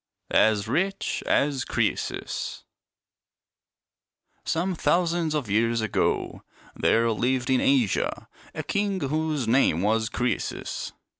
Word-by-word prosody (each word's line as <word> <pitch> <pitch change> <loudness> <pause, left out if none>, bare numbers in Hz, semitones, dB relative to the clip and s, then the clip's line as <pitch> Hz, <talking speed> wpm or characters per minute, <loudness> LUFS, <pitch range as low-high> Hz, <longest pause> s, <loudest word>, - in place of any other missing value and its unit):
■ - - 0
"AS 110 -1 +4
RICH 190 - -1
AS 140 -2 +2
CRCESUS" - - -2 1.8
Some 180 +3 -1
thousands 170 0 +1
of 145 -6 -2
years 115 +3 +1
ago 110 - -1 0.3
there 115 0 +2
lived 125 +3 0
in 130 - +3
Asia 130 -8 +1 0.3
.a - - -3
king 200 -1 -1
whose 155 -3 -1
name 110 - +3
was 110 +1 +1
Croesus. 120 0 -3
130 Hz, 105 wpm, -25 LUFS, 115-160 Hz, 1.8 s, AS